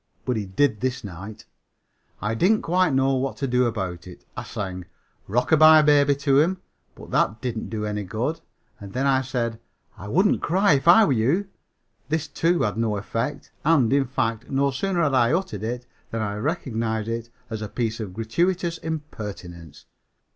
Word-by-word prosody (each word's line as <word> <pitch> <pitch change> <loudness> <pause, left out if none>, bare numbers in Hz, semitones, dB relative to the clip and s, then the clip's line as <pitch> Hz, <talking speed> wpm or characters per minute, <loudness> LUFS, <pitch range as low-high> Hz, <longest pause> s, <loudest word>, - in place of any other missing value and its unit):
But 125 - 0
he 105 -3 -3
did 110 +3 +1
this 130 -1 -2
night. 100 +2 -9 0.8
I 105 +2 0
didn't 190 - +2
quite 180 0 +2
know 135 0 +2
what 135 0 -1
to 140 - -2
do 125 0 +2
about 95 -6 -4
it. 90 - -13
I - - -4
sang 95 -3 -5 0.4
"Rockabye 155 +7 +6
Baby" 145 -1 +5
to 140 -1 +3
him, 180 +5 +2 0.4
but - - -12
that 110 - +1
didn't 120 -2 -4
do 110 -1 -3
any 105 -1 -3
good, 120 - -3 0.4
and 100 -1 -10
then 130 +2 0
I 135 -1 +3
said 120 -3 -3 0.4
"I 100 - -8
wouldn't 190 - +2
cry 190 0 +3
if 140 +3 0
I 195 +6 +8
were 140 - +2
you." 145 - +1 0.6
This, 160 0 -1
too, 170 +1 +1
had 105 0 -1
no 110 -2 0
effect, 120 +7 -4
and, 140 -6 +3
in 140 -1 +3
fact, 115 -2 -2
no 140 0 +1
sooner 175 +5 0
had 145 -3 +1
I 120 0 +3
uttered 165 - -2
it 120 +3 -4 0.2
than 115 -1 -2
I 105 -1 -3
recognized 115 -6 -2
it 115 0 -4 0.2
as 110 -1 -4
a 105 - -5
piece 115 -1 -2
of 100 -5 -6
gratuitous 170 - 0
impertinence. 100 - -7
125 Hz, 180 wpm, -24 LUFS, 110-150 Hz, 0.8 s, I